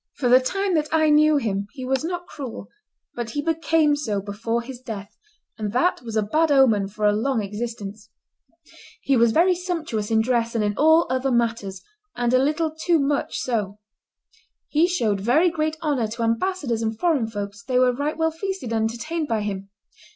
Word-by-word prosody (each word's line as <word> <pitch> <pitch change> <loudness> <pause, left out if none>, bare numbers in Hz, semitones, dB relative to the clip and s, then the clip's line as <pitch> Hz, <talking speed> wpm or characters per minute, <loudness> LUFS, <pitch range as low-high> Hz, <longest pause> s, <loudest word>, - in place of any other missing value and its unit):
For 250 - 0
the 250 +1 +7
time 390 +9 -1
that 305 -2 +1
I 315 -1 +3
knew 305 0 +5
him 200 -6 -2
he 260 -3 -7
was 265 +3 0
not 350 +1 -3
cruel; 255 - -8 0.4
but 240 -1 -4
he 290 - -2
became 325 -2 +2
so 220 -9 -2
before 225 +4 -3
his 250 0 -9
death, 215 -5 -8 0.4
and 210 -1 -3
that 345 +9 +1
was 230 -2 -7
a 215 - +2
bad 310 +9 +1
omen 230 -8 +4
for 210 +2 -3
a 210 - +4
long 225 +1 0
existence. 210 0 -6 0.9
He 275 - +2
was 235 -1 +4
very 350 +7 +4
sumptuous 330 - -3
in 220 -1 +3
dress 235 -1 0
and 220 - +1
in 205 0 0
all 320 +5 +5
other 260 +1 0
matters, 230 -6 -1 0.3
and 245 0 0
a 255 - +5
little 305 +4 +1
too 325 +2 +1
much 280 0 -1
so. 210 -5 -2 0.9
He 315 +3 +3
showed 220 - 0
very 300 - +3
great 315 -1 -1
honor 275 -7 0
to 230 +2 -4
ambassadors 235 0 -1
and 220 -1 -2
foreign 295 -6 +1
folks; 200 -2 -6
they 255 +2 -1
were 250 0 +4
right 285 +5 -2
well 320 0 +1
feasted 355 - -4
and 220 0 +1
entertained 305 +7 -4
by 225 -4 0
him. 195 -1 -4
250 Hz, 190 wpm, -23 LUFS, 220-310 Hz, 0.9 s, the